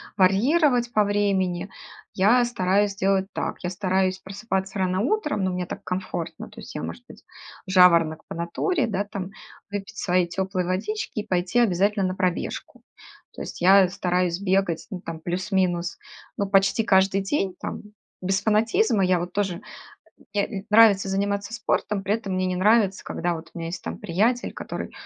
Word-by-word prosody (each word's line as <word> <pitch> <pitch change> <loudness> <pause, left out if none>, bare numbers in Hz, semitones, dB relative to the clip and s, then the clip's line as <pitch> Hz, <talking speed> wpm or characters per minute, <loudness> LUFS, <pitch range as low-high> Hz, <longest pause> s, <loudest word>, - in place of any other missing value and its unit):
варьировать 240 - +3
по 210 - +4
времени. 195 -3 0 0.4
Я 230 +6 +4
стараюсь 200 -3 +1
делать 195 0 +1
так: - - -3
я 175 - -1
стараюсь 185 0 0
просыпаться 190 0 -4
рано 185 0 +1
утром, 300 - 0
но 185 - 0
мне 180 0 -3
так - - -8
комфортно, 180 -2 -5
то - - -12
есть - - -11
я, - - -4
может 85 +1 -6
быть, - - -14 0.4
жаворонок 170 -4 +5
по - - -7
натуре, 235 - -1
да, 200 -2 -1
там 195 -2 -6 0.4
выпить 205 +1 -6
своей 180 -2 +1
тёплой 190 +1 -2
водички 205 - -3
и - - -5
пойти 180 +5 +1
обязательно 200 -2 +2
на 185 0 -2
пробежку. 185 -2 -3 0.5
То - - -9
есть - - -7
я 190 +1 +6
стараюсь 180 -2 0
бегать, 190 -4 0
ну, 180 -2 -5
там, 165 -3 -7
плюс-минус, 180 0 -1 0.4
ну, 200 - -1
почти 195 +3 +3
каждый 195 -1 +3
день, 195 -3 -1
там, - - -5 0.4
без 190 +1 0
фанатизма. 220 - +2
Я 180 -1 +2
вот 175 +1 -5
тоже 195 -4 -1 0.7
э, 200 -1 +1
мне 195 -3 -6
нравится 210 -3 +6
заниматься 200 +2 -1
спортом, 210 -3 -1
при 200 +2 +1
этом 205 -4 -5
мне 185 0 0
не 185 - -1
нравится, 200 0 +3
когда 175 0 -2
вот 165 0 -10
у - - -10
меня 165 - -4
есть, 170 +1 -6
там, 80 +1 -5
приятель, 225 +9 0
который: - - -6
190 Hz, 170 wpm, -24 LUFS, 180-205 Hz, 0.7 s, я